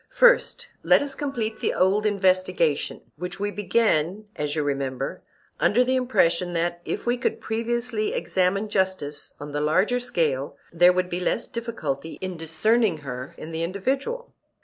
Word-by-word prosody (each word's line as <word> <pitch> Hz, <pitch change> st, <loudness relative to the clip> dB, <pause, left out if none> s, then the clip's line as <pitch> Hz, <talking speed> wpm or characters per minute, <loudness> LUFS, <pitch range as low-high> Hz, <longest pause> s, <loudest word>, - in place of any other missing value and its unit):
First -, -, +4 dB, 0.2 s
let -, -, +5 dB
us 280 Hz, -1 st, -4 dB
complete 250 Hz, -6 st, -3 dB
the -, -, 0 dB
old 200 Hz, +3 st, +3 dB
investigation, 185 Hz, -6 st, +1 dB, 0.2 s
which 180 Hz, +3 st, -5 dB
we 205 Hz, +1 st, -1 dB
began, 205 Hz, -2 st, +1 dB
as 150 Hz, 0 st, -2 dB
you 155 Hz, -, 0 dB
remember, 135 Hz, -2 st, -2 dB, 0.4 s
under 245 Hz, +4 st, +4 dB
the 260 Hz, +1 st, +1 dB
impression 185 Hz, -9 st, +2 dB
that, 175 Hz, +1 st, -1 dB
if -, -, -3 dB
we 240 Hz, +1 st, +1 dB
could -, -, -1 dB
previously 230 Hz, 0 st, -1 dB
examine 190 Hz, +3 st, 0 dB
justice 185 Hz, -8 st, -1 dB
on 145 Hz, 0 st, -7 dB
the 145 Hz, +1 st, -2 dB
larger 185 Hz, +11 st, +2 dB
scale, 155 Hz, -, -1 dB, 0.2 s
there 175 Hz, +1 st, +6 dB
would 180 Hz, 0 st, -1 dB
be 175 Hz, -, -1 dB
less 185 Hz, +5 st, 0 dB
difficulty 165 Hz, -, -4 dB
in 185 Hz, -1 st, -4 dB
discerning 170 Hz, +3 st, +1 dB
her 130 Hz, +5 st, -6 dB
in 160 Hz, -, -8 dB
the 160 Hz, 0 st, -3 dB
individual. 270 Hz, -, -2 dB
185 Hz, 155 wpm, -25 LUFS, 165-230 Hz, 0.4 s, there